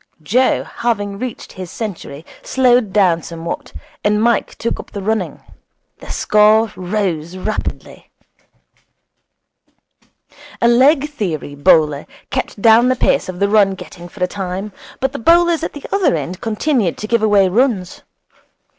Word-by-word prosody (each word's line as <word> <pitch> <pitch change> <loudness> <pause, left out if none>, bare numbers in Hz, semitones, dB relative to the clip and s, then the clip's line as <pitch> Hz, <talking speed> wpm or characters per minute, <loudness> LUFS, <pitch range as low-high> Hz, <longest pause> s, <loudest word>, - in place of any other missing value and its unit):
Joe, 250 - +2
having 205 -4 -3
reached 255 -1 -6
his 185 -2 -8
century, 170 -8 -7 0.2
slowed 245 -5 +2
down 185 -5 +3
somewhat, 165 +1 -6 0.3
and 210 0 +2
Mike 235 +1 +1
took 235 - -3
up - - -9
the 200 - -6
running. 220 +2 -2 0.6
The - - -12
score 215 +1 +3
rose 180 -3 -3
rapidly. 215 +3 -5 2.5
A 235 - +3
leg 270 +5 +4
theory 180 - -4
bowler 145 0 +3 0.2
kept - - -3
down 230 +2 +6
the 255 - +2
pace 235 - +1
of 180 - -6
the 200 - +2
run 200 -2 +3
getting 175 -1 -11
for 180 +1 -5
a - - +2
time, 190 +2 -5 0.3
but 265 0 0
the 280 - -6
bowlers 340 +5 +4
at - - -3
the 290 - -9
other 390 - +2
end 165 +4 -5
continued 225 - 0
to - - -5
give 235 0 +1
away 205 -3 +4
runs. 200 -3 0
210 Hz, 145 wpm, -17 LUFS, 180-235 Hz, 2.5 s, down